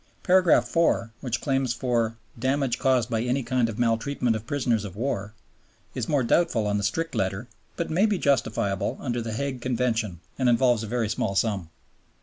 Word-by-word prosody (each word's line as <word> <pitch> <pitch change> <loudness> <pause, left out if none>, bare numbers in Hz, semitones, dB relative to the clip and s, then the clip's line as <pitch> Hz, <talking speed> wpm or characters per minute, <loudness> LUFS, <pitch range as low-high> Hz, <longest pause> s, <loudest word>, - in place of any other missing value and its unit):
Paragraph 185 -1 +4
4, 160 -9 +1
which 120 -2 -2
claims 135 -3 0
for 115 -3 0 0.2
"damage 130 0 0
caused 130 -4 +2
by 115 -2 -1
any 125 +3 0
kind 120 -1 +1
of 110 - -6
maltreatment 120 +1 +1
of 110 +1 -6
prisoners 120 -6 0
of 100 -3 -7
war," 110 -3 -3 0.6
is - - -3
more 145 -4 +2
doubtful 120 -3 +2
on 105 0 0
the - - -3
strict 165 +12 -1
letter, 95 +5 -2 0.3
but 170 - -3
may 190 +7 +3
be 210 -2 +1
justifiable 110 - 0
under 120 -3 -2
the 115 -1 -4
Hague 130 +1 -3
Convention 115 -7 -1 0.2
and 130 -2 +3
involves 120 -1 +3
a 110 - -5
very 120 0 0
small 100 -2 -1
sum. 95 -6 0
120 Hz, 180 wpm, -26 LUFS, 110-135 Hz, 0.6 s, Paragraph